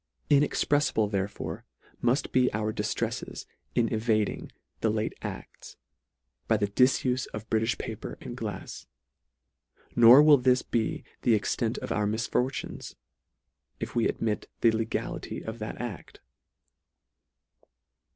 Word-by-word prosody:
Inexpremble 145 -5 +3
therefore 100 0 -3 0.4
mull: 120 +1 +4 0.2
be 125 -1 +3
our 110 0 -1
di - - -2
ftreffes - - -3 0.3
in 120 -2 +3
evading 110 -1 0 0.3
the 110 - +1
late 110 0 -1
a6ts, - - -8 0.7
by 110 - +3
the 105 - +1
dif 125 +6 +3
ufe 130 0 0
of 105 +1 -7
Britifh 110 +1 +1
paper - - -6
and - - -7
glafs. - - -6 1.1
Nor 120 +4 +9
will 150 -1 +8
this 125 0 +3
be 115 -2 -1 0.2
the 115 - +4
extent 110 +2 -1
of - - -5
our 105 -1 +1
misfortunes, 115 +4 -2 0.8
if - - -5
we 120 - +2
ad - - -4
mit 110 -2 -1
the 115 - +6
legality 110 0 -3
of 110 +1 -6
that 110 -1 -6
act. 120 -7 -7
115 Hz, 130 wpm, -28 LUFS, 110-125 Hz, 1.1 s, Nor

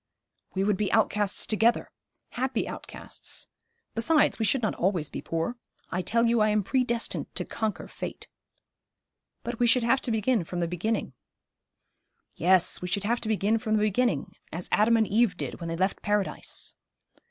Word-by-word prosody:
'We 190 - +1
would 205 -1 +2
be 205 0 0
outcasts 210 -2 +2
together 225 +2 +2 0.4
happy 255 -1 -1
outcasts. - - -6 0.5
Besides, 260 +7 +3
we 220 - +1
should 240 +3 +1
not 215 - +1
always 175 -5 0
be - - -6
poor. 165 +9 -2 0.3
I 180 - 0
tell 230 +5 +2
you 235 0 +3
I 215 - +4
am 210 -1 +2
predestined 235 +1 0
to - - -2
conquer 220 -2 -3
fate.' - - -7 1.2
'But 235 -1 -4
we 240 - +4
should 245 +1 +4
have 260 +3 +3
to - - -2
begin 220 -1 +1
from 175 +2 -5
the 170 - 0
beginning.' 180 - -2 1.2
'Yes, 180 +1 +3
we 180 - -3
should 200 +3 -1
have 235 +3 0
to 220 - -3
begin 220 +1 +2
from 220 -2 0
the 210 - +2
beginning, 215 - +1 0.2
as 175 +2 -5
Adam 230 +2 +4
and 220 - +3
Eve 215 -2 +2
did - - -5
when 170 -1 -5
they 165 - -3
left 190 +2 0
Paradise.' 205 -1 -2
215 Hz, 175 wpm, -27 LUFS, 190-235 Hz, 1.2 s, I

